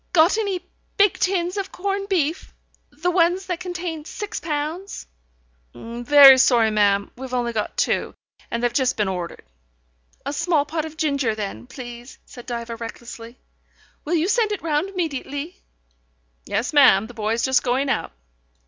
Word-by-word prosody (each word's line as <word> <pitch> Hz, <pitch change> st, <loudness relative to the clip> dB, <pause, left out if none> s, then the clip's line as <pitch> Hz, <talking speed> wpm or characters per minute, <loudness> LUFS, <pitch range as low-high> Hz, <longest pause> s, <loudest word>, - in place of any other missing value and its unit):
"Got 345 Hz, +5 st, +5 dB
any 395 Hz, -4 st, -2 dB, 0.3 s
big 405 Hz, -1 st, +4 dB
tins 365 Hz, 0 st, 0 dB
of 390 Hz, -1 st, -3 dB
corned 395 Hz, +1 st, -3 dB
beef? 335 Hz, -2 st, -1 dB, 0.3 s
The 340 Hz, +5 st, -2 dB
ones 355 Hz, +2 st, +2 dB
that 360 Hz, -2 st, -3 dB
contain 355 Hz, -3 st, -5 dB
six 415 Hz, +6 st, -6 dB
pounds." 320 Hz, +5 st, -4 dB, 0.7 s
"Very 260 Hz, +4 st, +6 dB
sorry, 240 Hz, -4 st, +4 dB
ma'am. 200 Hz, -1 st, +2 dB
We've 255 Hz, 0 st, -6 dB
only 240 Hz, -1 st, -1 dB
got 215 Hz, -2 st, -3 dB
two, -, -, 0 dB, 0.3 s
and 235 Hz, +1 st, -3 dB
they've 240 Hz, -1 st, +1 dB
just 260 Hz, 0 st, +1 dB
been 210 Hz, -2 st, +1 dB
ordered." 180 Hz, -2 st, -5 dB, 0.8 s
"A 280 Hz, -, -3 dB
small 325 Hz, -2 st, +1 dB
pot 315 Hz, +1 st, -3 dB
of 315 Hz, 0 st, -10 dB
ginger 280 Hz, -7 st, 0 dB
then, 210 Hz, +3 st, -6 dB
please," 240 Hz, -1 st, -10 dB
said 245 Hz, -, -13 dB
Diva 235 Hz, -1 st, -5 dB
recklessly. 230 Hz, +1 st, -9 dB, 0.7 s
"Will 330 Hz, +4 st, -1 dB
you 330 Hz, +2 st, +1 dB
send 440 Hz, 0 st, +2 dB
it 415 Hz, -, -4 dB
round 315 Hz, +3 st, 0 dB
immediately?" 315 Hz, -3 st, -4 dB, 0.9 s
"Yes, 235 Hz, +8 st, -1 dB
ma'am. 240 Hz, -9 st, +6 dB
The 245 Hz, -, -11 dB
boy's 225 Hz, 0 st, -1 dB
just 265 Hz, -1 st, +3 dB
going 260 Hz, +3 st, 0 dB
out." 270 Hz, -, -1 dB
285 Hz, 155 wpm, -22 LUFS, 240-355 Hz, 0.9 s, Very